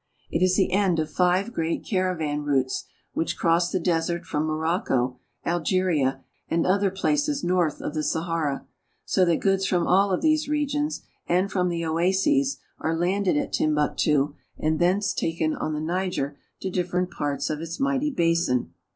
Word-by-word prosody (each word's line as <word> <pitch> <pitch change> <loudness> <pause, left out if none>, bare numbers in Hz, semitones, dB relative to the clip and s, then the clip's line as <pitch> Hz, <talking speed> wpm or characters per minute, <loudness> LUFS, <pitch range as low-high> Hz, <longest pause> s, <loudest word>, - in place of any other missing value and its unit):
It 165 - 0
is 185 0 +4
the 190 - +2
end 190 -3 +2
of 155 -1 -1
five 185 +5 +2
great 165 0 -2
caravan 180 -7 -1
routes 135 -3 0 0.3
which 165 - -1
cross 170 +1 +2
the 185 - 0
desert 170 0 0
from 150 +1 -1
Morocco, 155 -6 0 0.3
Algeria, 165 -6 +1 0.3
and 165 0 +1
other 195 +2 +3
places 290 +9 0
north 175 -4 +1
of - - -4
the 155 - -1
Sahara; 160 -2 -1 0.4
so 190 - +2
that 170 -2 +2
goods 195 -1 +2
from 175 -2 +1
all 195 +2 +4
of 185 - 0
these 310 -1 +2
regions 295 0 -1 0.2
and 185 +3 +1
from 180 -2 +1
the 170 -1 -2
oases 190 - +2 0.2
are 165 +1 -1
landed 185 0 +1
at - - -2
Tim 155 -1 +2
buktu, 150 -1 +1 0.2
and 155 0 0
thence 185 +4 +2
taken 160 -1 -1
on 155 - -3
the - - -2
Niger 170 -3 -2 0.3
to 190 - -3
differ 180 0 -1
ent 180 - -3
parts 145 +1 -2
of 155 0 -3
its 165 0 -6
mighty 275 +1 +1
basin. 165 - +1
175 Hz, 170 wpm, -25 LUFS, 155-190 Hz, 0.4 s, is